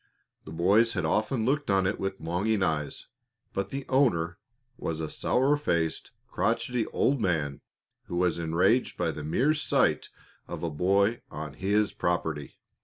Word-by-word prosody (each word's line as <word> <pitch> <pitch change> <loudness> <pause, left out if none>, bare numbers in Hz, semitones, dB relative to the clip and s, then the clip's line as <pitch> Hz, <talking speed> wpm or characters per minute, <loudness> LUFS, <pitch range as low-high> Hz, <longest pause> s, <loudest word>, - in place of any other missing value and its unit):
The 75 - -9
boys 100 +8 +3
had 90 -5 -1
often 110 - 0
looked 145 +1 0
on 95 -1 +3
it 95 - -1
with 95 0 -3
longing 95 +5 0
eyes, 80 -4 -2 0.5
but 100 - -2
the 135 0 -5
owner 95 -10 +2 0.4
was 80 -8 -4
a 80 -1 -4
sour 135 +4 +2
faced, 85 - -1 0.2
crotchety 125 -2 0
old 135 -2 +1
man 75 -7 -1 0.4
who - - -6
was 90 -1 +1
enraged 85 +9 +2
by - - 0
the 75 - -7
mere 130 - +2
sight 150 - +1 0.4
of - - -6
a 85 - -1
boy 100 +8 +2
on 75 +1 -6
his 100 +2 +1
property. 80 -4 -2
95 Hz, 155 wpm, -28 LUFS, 80-115 Hz, 0.5 s, boys